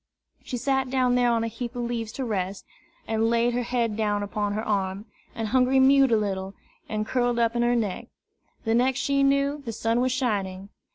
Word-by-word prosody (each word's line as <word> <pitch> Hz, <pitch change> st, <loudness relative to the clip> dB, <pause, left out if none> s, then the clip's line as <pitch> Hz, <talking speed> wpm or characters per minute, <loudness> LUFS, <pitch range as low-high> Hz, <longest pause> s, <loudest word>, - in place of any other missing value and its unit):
She 250 Hz, -, -4 dB
sat 265 Hz, +1 st, 0 dB
down 255 Hz, -1 st, +2 dB
there 245 Hz, -1 st, +3 dB
on 230 Hz, -1 st, +1 dB
a -, -, -1 dB
heap 235 Hz, +2 st, -6 dB
of 245 Hz, -, -2 dB
leaves 230 Hz, -2 st, -3 dB
to 265 Hz, -, -3 dB
rest, 195 Hz, -3 st, -3 dB, 0.4 s
and 225 Hz, 0 st, +1 dB
laid 235 Hz, +1 st, +2 dB
her 245 Hz, -, 0 dB
head 235 Hz, -3 st, -1 dB
down 205 Hz, -1 st, 0 dB
upon 205 Hz, 0 st, -2 dB
her 215 Hz, +2 st, -3 dB
arm, 195 Hz, -1 st, -1 dB, 0.3 s
and 225 Hz, -1 st, -3 dB
Hungry 260 Hz, +2 st, +3 dB
mewed 270 Hz, -1 st, +5 dB
a 225 Hz, -, +5 dB
little, 195 Hz, -2 st, -3 dB, 0.3 s
and 215 Hz, -1 st, -2 dB
curled 245 Hz, 0 st, 0 dB
up 230 Hz, 0 st, +1 dB
in 235 Hz, -, +1 dB
her 240 Hz, 0 st, +2 dB
neck. 210 Hz, -6 st, -2 dB, 0.6 s
The 225 Hz, -, +1 dB
next 250 Hz, +2 st, +2 dB
she 275 Hz, 0 st, +1 dB
knew, 280 Hz, +1 st, +2 dB
the 230 Hz, -, -4 dB
sun 230 Hz, +2 st, 0 dB
was 255 Hz, 0 st, +1 dB
shining. 200 Hz, -7 st, -2 dB
235 Hz, 210 wpm, -25 LUFS, 215-255 Hz, 0.6 s, mewed